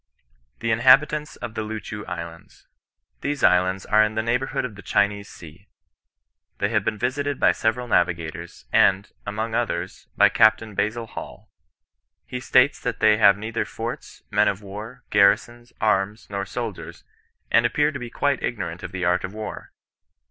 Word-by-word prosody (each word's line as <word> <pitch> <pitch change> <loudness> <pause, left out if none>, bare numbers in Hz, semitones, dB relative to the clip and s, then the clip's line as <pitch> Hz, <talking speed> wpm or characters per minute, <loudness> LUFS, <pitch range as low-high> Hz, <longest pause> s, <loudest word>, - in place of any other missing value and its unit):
THE 115 -1 0
INHABITANTS 135 +6 +4
OP 115 - -5
THE 110 - -3
LOOCHOO 105 -1 -6
ISLANDS. 85 -2 -8 0.6
These 145 0 -3
islands 95 +1 +3
are 110 +1 +4
in 105 0 -1
the 110 - 0
neighbourhood 125 +4 -1
of 120 - -6
the 100 - -12
Chinese 100 0 0
Sea. 85 +5 -14 0.9
They 100 - 0
have 105 -3 +1
been 110 +1 -1
visited 140 +5 -2
by - - +5
several 120 +2 -1
navigators, 85 -4 -1
and, 100 +2 +3 0.2
among 110 +2 -3
others, 95 -7 -3
by - - +6
Captain 110 -1 +3
Basil 110 +4 -1
Hall. 110 - -10 0.7
He 125 - -5
states 130 +2 +3
that - - -3
they 110 -1 +5
have 100 -2 +6
neither 110 +2 -3
forts, 115 +1 -7
men - - +3
of 100 +1 -1
war, 105 +6 -9
garrisons, 120 +4 +2
arms, 105 0 0
nor 100 -1 -3
soldiers, 115 -6 -6 0.5
and 115 - +5
appear 145 +5 +2
to 140 - -6
be 120 -1 -6
quite 140 +1 0
ignorant 90 -7 -4
of 95 - -7
the 90 -2 -3
art 90 +1 +2
of 95 +3 -6
war. 110 0 -7
110 Hz, 160 wpm, -23 LUFS, 100-120 Hz, 0.9 s, by